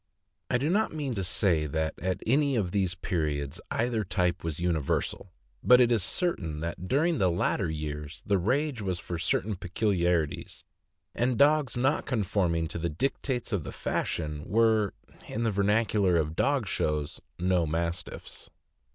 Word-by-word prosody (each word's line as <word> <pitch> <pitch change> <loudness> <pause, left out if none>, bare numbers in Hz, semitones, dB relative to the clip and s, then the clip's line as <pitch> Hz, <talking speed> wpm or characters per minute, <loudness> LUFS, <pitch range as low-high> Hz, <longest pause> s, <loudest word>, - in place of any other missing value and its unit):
I 125 - +3
do 135 +4 -1
not 215 +3 +2
mean 145 -4 -2
to 100 -4 -2
say 85 -4 +2
that 80 +1 -1
at 95 +3 -2
any 140 +3 +3
of 100 -6 0
these 95 -3 0
periods 75 -5 -2
either 115 -2 0
type 90 -2 0
was 80 -2 -3
universal; 85 +2 -1 0.3
but 125 0 +7
it 120 -1 +5
is 115 -3 +3
certain 85 - -1
that 85 +2 -4
during 155 - +2
the 95 - +4
later 85 +1 0
years 75 -1 -5
the 100 -2 +2
rage 130 - 0
was 95 -3 -1
for 85 -1 -5
certain 100 +4 0
peculiarities, 90 -4 -1 0.5
and 120 0 0
dogs 145 -4 +4
riot 135 +5 +1
conforming 95 -8 0
to 85 - -4
the 85 +1 -1
dictates 125 - -2
of 95 -6 0
the - - -6
fashion 75 -2 -2
were, 110 -2 +3 0.3
in 115 - -3
the 115 - +2
vernacular 100 -1 +2
of 80 0 -1
dog 140 +1 +1
shows, 75 -6 -2 0.2
"no 90 -2 +1
Mastiffs." 85 +2 -4
95 Hz, 160 wpm, -28 LUFS, 85-115 Hz, 0.5 s, but